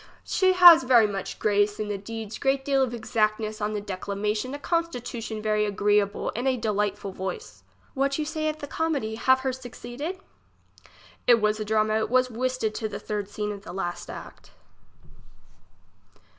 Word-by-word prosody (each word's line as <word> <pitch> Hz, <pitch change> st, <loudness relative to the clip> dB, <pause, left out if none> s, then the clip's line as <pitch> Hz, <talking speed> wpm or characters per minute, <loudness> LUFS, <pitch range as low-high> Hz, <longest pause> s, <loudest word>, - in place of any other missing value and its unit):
She 375 Hz, -1 st, +2 dB
has 350 Hz, -4 st, +9 dB
very 250 Hz, -3 st, +5 dB
much 195 Hz, -2 st, -4 dB
grace 205 Hz, 0 st, +1 dB
in 215 Hz, -, -2 dB
the 205 Hz, -, -2 dB
deeds 220 Hz, +1 st, -7 dB
great 270 Hz, 0 st, +1 dB
deal 275 Hz, -1 st, +2 dB
of 260 Hz, -3 st, +1 dB
exactness 215 Hz, -2 st, -1 dB
on 210 Hz, +1 st, -1 dB
the 210 Hz, -, -1 dB
declamation, 210 Hz, +5 st, -3 dB
a -, -, -4 dB
constitu 290 Hz, -7 st, -2 dB
tion 220 Hz, -1 st, -5 dB
very 215 Hz, -1 st, +1 dB
agreable, 205 Hz, 0 st, +1 dB
and 245 Hz, +4 st, -1 dB
a 260 Hz, -1 st, +2 dB
delightful 205 Hz, -3 st, -1 dB
voice. 185 Hz, -, -6 dB, 0.3 s
What 275 Hz, +1 st, 0 dB
you 305 Hz, -, -1 dB
say 310 Hz, 0 st, -1 dB
of 305 Hz, -, -4 dB
the 300 Hz, -, -6 dB
comedy? 285 Hz, -7 st, -2 dB
Have 260 Hz, +4 st, +3 dB
her 260 Hz, -1 st, -1 dB
suc 250 Hz, -2 st, -9 dB
ceded? 280 Hz, +11 st, -6 dB, 1.1 s
It 240 Hz, -1 st, +6 dB
was 215 Hz, 0 st, +1 dB
a 215 Hz, -, -3 dB
drama; 215 Hz, 0 st, +2 dB
it 220 Hz, -, -2 dB
was 255 Hz, +1 st, +2 dB
whistted 250 Hz, -2 st, -1 dB
to 220 Hz, -1 st, -3 dB
the 205 Hz, -, -5 dB
third 205 Hz, -2 st, -4 dB
scene 210 Hz, 0 st, -3 dB
of 200 Hz, -1 st, -7 dB
the 200 Hz, -, -9 dB
last 175 Hz, -2 st, -4 dB
act. -, -, -10 dB
220 Hz, 180 wpm, -26 LUFS, 210-260 Hz, 1.1 s, has